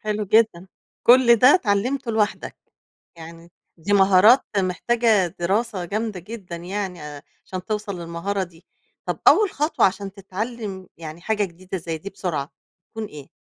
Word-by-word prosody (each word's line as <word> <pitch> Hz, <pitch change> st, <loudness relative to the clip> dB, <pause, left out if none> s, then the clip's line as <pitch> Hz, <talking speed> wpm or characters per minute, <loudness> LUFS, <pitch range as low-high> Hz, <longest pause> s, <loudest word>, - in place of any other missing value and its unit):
حلو 210 Hz, 0 st, -2 dB
جدًا. 210 Hz, -3 st, +2 dB, 0.4 s
كل 240 Hz, -1 st, +6 dB
ده 250 Hz, +5 st, +6 dB
اتعلِمته 245 Hz, -, 0 dB
لوحدّك، 215 Hz, -1 st, -1 dB, 0.6 s
يعني 165 Hz, +1 st, -12 dB, 0.3 s
دي 190 Hz, +5 st, -3 dB
مهارات 200 Hz, +5 st, +6 dB
محتاجة 210 Hz, +2 st, +2 dB
دراسة 195 Hz, +2 st, -1 dB
جامدة 210 Hz, +1 st, -3 dB
جدًا 190 Hz, -3 st, -8 dB
يعني 180 Hz, 0 st, -5 dB
آآ 145 Hz, -1 st, -9 dB, 0.2 s
عشان 185 Hz, -1 st, -6 dB
توصَلّ 210 Hz, -2 st, -4 dB
للمهارة 170 Hz, +4 st, -3 dB
دي، 175 Hz, -2 st, -11 dB, 0.4 s
طَب -, -, -2 dB
أول 425 Hz, -3 st, +5 dB
خطوة 300 Hz, 0 st, +2 dB
عشان 195 Hz, +1 st, -3 dB
تتعلم، 200 Hz, 0 st, -6 dB
يعني 160 Hz, 0 st, -9 dB
حاجة 210 Hz, +2 st, 0 dB
جديدة 185 Hz, +1 st, -7 dB
زي 165 Hz, -1 st, -5 dB
دي 200 Hz, +5 st, -8 dB
بسرعة 160 Hz, -7 st, -4 dB, 0.4 s
تكون 220 Hz, 0 st, -5 dB
إيه؟ 150 Hz, -8 st, -11 dB
195 Hz, 145 wpm, -22 LUFS, 175-220 Hz, 0.6 s, كل